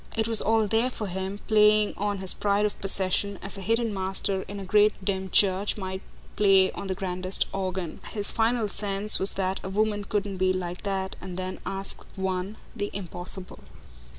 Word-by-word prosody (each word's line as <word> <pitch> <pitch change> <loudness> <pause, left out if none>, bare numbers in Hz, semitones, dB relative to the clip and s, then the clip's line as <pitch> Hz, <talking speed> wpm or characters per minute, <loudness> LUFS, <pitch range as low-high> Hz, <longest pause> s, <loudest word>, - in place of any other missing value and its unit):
It 220 0 +1
was 225 -2 +7
all 225 0 +3
there 225 +4 +1
for 225 -4 -5
him, 190 +1 -4
playing 210 -1 +4
on 205 0 -1
his 190 -1 -1
pride 205 0 +1
of 210 - -3
possession 195 +1 0
as 195 - -5
a 195 - -7
hidden 230 +2 0
master 190 0 -1
in 200 0 -6
a 195 - -6
great 210 +2 +4
dim 190 -1 -1
church 195 +2 +3
might 190 -1 -5 0.3
play 195 -2 +5
on 200 - -7
the 190 - -2
grandest 185 0 -1
organ. 185 -3 -3
His 205 -2 +2
final 225 0 +1
sense 200 +1 +2
was 190 - +5
that 190 0 -1
a 190 - -4
woman 205 +1 0
couldn't 200 -2 -2
be 185 0 +2
like 180 -1 -4
that 190 -1 -2
and 185 -1 -7
then 185 0 -4
ask 195 0 -4
of - - -19
one 190 +2 -2 0.2
the 205 -2 -2
impossible. 185 0 -5
195 Hz, 190 wpm, -26 LUFS, 190-210 Hz, 0.3 s, was